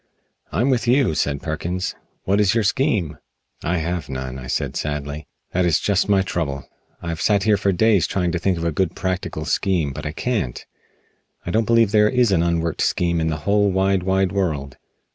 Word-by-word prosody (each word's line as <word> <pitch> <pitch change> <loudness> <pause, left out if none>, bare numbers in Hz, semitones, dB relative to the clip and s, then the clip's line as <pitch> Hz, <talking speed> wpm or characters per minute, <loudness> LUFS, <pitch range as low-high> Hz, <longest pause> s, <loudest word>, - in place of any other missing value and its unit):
"I'm 120 - +1
with 125 -1 0
you," 125 - +3
said 70 -2 -1
Perkins, 85 +4 -3 0.3
"what 100 +2 +2
is 105 +1 +2
your 115 - +2
scheme?" 105 - 0 0.4
"I 90 +2 0
have 85 -1 -3
none," 65 -1 -5
I 65 - -8
said - - -2
sadly, 75 0 -4 0.2
"that 90 - +1
is 85 -3 +3
just 100 -1 +1
my 100 -2 +4
trouble. 70 -7 -3 0.4
I 85 - -4
have 85 -1 -4
sat 100 -2 +2
here 110 0 +4
for 100 0 +1
days 100 -2 +3
trying 90 -3 -1
to 85 - -1
think 90 0 0
of 85 - -4
a 85 - +1
good 90 +2 -1
practical 90 -4 -3
scheme, 85 -5 0
but 75 +1 -5
I - - -3
can't. 105 - -2 0.8
I 90 - -3
don't 110 +3 +2
believe 115 -3 +4
there 105 0 +4
is 125 -3 +2
an 90 -4 +3
unworked 85 -1 0
scheme 85 -1 +1
in 80 - 0
the 80 -1 -1
whole 100 0 +3
wide, 95 0 +1
wide 95 0 +1
world." 75 -9 -2
90 Hz, 200 wpm, -21 LUFS, 80-100 Hz, 0.8 s, my